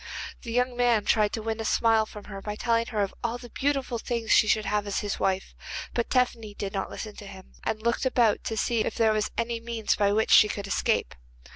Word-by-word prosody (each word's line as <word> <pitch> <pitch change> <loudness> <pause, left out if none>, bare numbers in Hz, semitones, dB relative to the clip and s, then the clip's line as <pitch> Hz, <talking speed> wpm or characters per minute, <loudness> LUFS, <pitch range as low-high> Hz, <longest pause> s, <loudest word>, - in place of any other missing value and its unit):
The 235 - -7
young 250 +1 +1
man 240 -4 +2
tried 210 -2 +3
to 220 - -3
win 225 0 -2
a - - -2
smile 220 -1 +3
from 210 -1 -10
her 195 -1 -8
by 210 +1 -4
telling 230 +1 0
of 205 -3 -1
all 235 0 -1
the 240 -2 -12
beautiful 275 -4 -1
things 230 -1 -3
she 215 - +6
should 215 +1 +2
have 210 0 0
as 200 - -1
his 205 -1 -3
wife, 190 0 -1 0.4
but 235 - -1
Tephany 235 -5 0
did 200 -1 -4
not 195 -1 -2
listen 215 -2 -7
to 205 - -9
him, 190 -1 -12
and 215 0 -2
looked 235 +3 +1
about 235 -5 +2
to 225 - -3
see 235 +1 +1
if - - -1
there 225 -2 +3
was 215 0 0
any 230 0 -1
means 230 -2 -1
by 200 -1 +2
which 220 +2 +1
she 210 - +8
could 205 -1 -4
escape. 195 - 0
220 Hz, 235 wpm, -27 LUFS, 210-235 Hz, 0.4 s, she